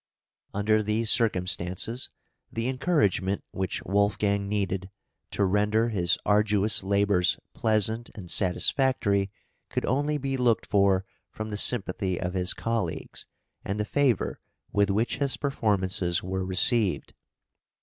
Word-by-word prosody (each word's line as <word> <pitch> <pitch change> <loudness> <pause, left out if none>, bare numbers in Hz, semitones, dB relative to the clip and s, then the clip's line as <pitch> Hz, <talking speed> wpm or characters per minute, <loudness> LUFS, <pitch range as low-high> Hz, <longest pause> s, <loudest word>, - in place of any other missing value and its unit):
Under 110 +2 +2
these 110 +2 +1
circumstances, 95 +2 0 0.4
the 115 +1 -2
encouragement 115 - +1
which 95 -2 -3
Wolfgang 100 0 +1
needed 95 -2 -2 0.4
to 100 - 0
render 105 +4 +2
his 90 -6 +1
arduous 105 -1 +3
labours 100 -2 +2 0.2
pleasant 110 +1 +1
and 90 -5 -6
satisfactory 100 - +1 0.4
could - - -2
only 145 +3 0
be 135 -1 -2
looked 120 -3 +2
for 100 -2 +2 0.3
from 110 0 -6
the - - -3
sympathy 95 -5 +1
of 90 0 -3
his 90 -1 0
colleagues, 115 -7 -3 0.4
and 100 +2 -3
the 105 - 0
favour 135 -4 +1 0.3
with 100 -1 +2
which 110 +4 0
his 140 -2 -1
performances 95 - 0
were 95 +1 -2
received. 95 +2 +1
105 Hz, 120 wpm, -27 LUFS, 95-115 Hz, 0.4 s, arduous